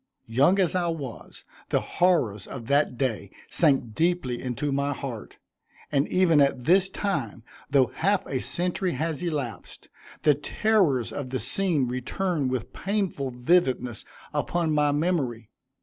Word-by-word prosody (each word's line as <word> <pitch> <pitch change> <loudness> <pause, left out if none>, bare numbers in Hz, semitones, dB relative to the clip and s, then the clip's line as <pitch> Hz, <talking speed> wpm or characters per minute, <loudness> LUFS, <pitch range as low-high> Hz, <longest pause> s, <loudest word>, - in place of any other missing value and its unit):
Young 135 +11 +3
as 185 -4 +2
I 180 -2 +1
was, 145 -8 -6 0.2
the - - +2
horrors 145 - +1
of 120 -4 -7
that 140 -1 +2
day 115 -7 -2 0.2
sank 135 -8 +2
deeply 160 -6 0
into 130 +3 -2
my 140 +1 0
heart, 130 -5 -7 0.5
and 140 -1 +2
even 170 -5 +4
at 135 -2 +2
this 185 +6 +4
time, 140 - -3 0.3
though 135 -2 +3
half 200 +4 +1
a 130 - -2
century 180 +4 -1
has 160 -2 -2
elapsed, 145 - -5 0.3
the 150 - +6
terrors 145 - +1
of 140 -3 -4
the 130 - -2
scene 145 - +1
return 140 +5 -1
with 130 -2 -3
painful 195 -9 -2
vividness 125 - +1 0.3
upon 170 -2 0
my 150 -1 +3
memory. 145 - -1
145 Hz, 140 wpm, -26 LUFS, 125-175 Hz, 0.5 s, the